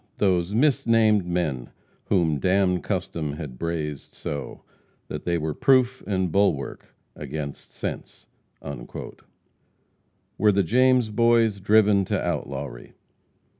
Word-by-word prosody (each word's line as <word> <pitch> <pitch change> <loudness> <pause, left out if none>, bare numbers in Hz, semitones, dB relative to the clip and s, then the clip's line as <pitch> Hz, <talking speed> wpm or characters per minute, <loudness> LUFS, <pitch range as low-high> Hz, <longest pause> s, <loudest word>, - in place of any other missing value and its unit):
"Those 90 -2 +1
misnamed 115 -7 +3
men 80 -9 -2 0.4
Whom 85 -7 +1
damned 90 +1 +2
custom 85 -6 -3
had 70 -5 -8
brazed 75 -4 -4
so 70 -2 -6 0.5
That - - -6
they 85 -1 +1
were 80 -1 -2
proof 130 - +3
and 95 -4 0
bulwark 90 -9 0 0.2
against 75 0 -6
sense." - - -7 2.1
Were 105 +2 +5
the 100 0 +2
James 125 +3 +3
boys 115 -2 +3
driven 105 0 +4
to - - -1
outlawry? 65 -3 -4
95 Hz, 105 wpm, -24 LUFS, 75-110 Hz, 2.1 s, Were